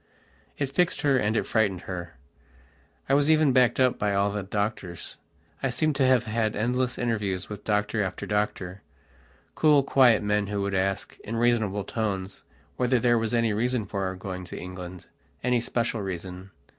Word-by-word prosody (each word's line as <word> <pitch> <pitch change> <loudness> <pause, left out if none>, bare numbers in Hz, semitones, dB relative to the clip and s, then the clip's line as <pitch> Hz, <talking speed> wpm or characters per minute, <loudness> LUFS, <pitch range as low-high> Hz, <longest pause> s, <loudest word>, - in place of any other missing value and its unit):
It 140 - 0
fixed 180 +5 +1
her 140 -2 +3
and 110 -2 +1
it - - 0
frightened 100 -5 +1
her. 90 -3 -6 0.9
I - - +1
was 145 +2 +3
even 155 -4 +4
backed 125 -1 +4
up 130 -1 +3
by 100 -1 +1
all 100 +1 +2
the 105 0 -2
doctors. 100 -3 -4 0.4
I 135 - 0
seemed 150 +5 +1
to 135 - +3
have 130 -2 +4
had 110 -1 -1
endless 125 +3 0
interviews 105 -6 -2
with 105 -1 -7
doctor 105 0 0
after 95 -2 -3
doctor, 100 -2 -2 0.7
cool, 150 -3 +4
quiet 125 -6 +4
men, 105 0 +1
who 100 -1 -2
would 100 0 -2
ask, 95 +1 -1
in 115 - -6
reasonable 115 -4 +1
tones, 100 -3 -3 0.4
whether 125 0 +2
there 120 0 +3
was 115 +1 -1
any 115 -2 +2
reason 120 +1 0
for 100 0 -3
our 95 0 -3
going 95 -1 -6
to - - -8
Englandany 90 +7 -5
special 115 -1 -1
reason. 95 0 -6
105 Hz, 170 wpm, -26 LUFS, 95-125 Hz, 0.9 s, even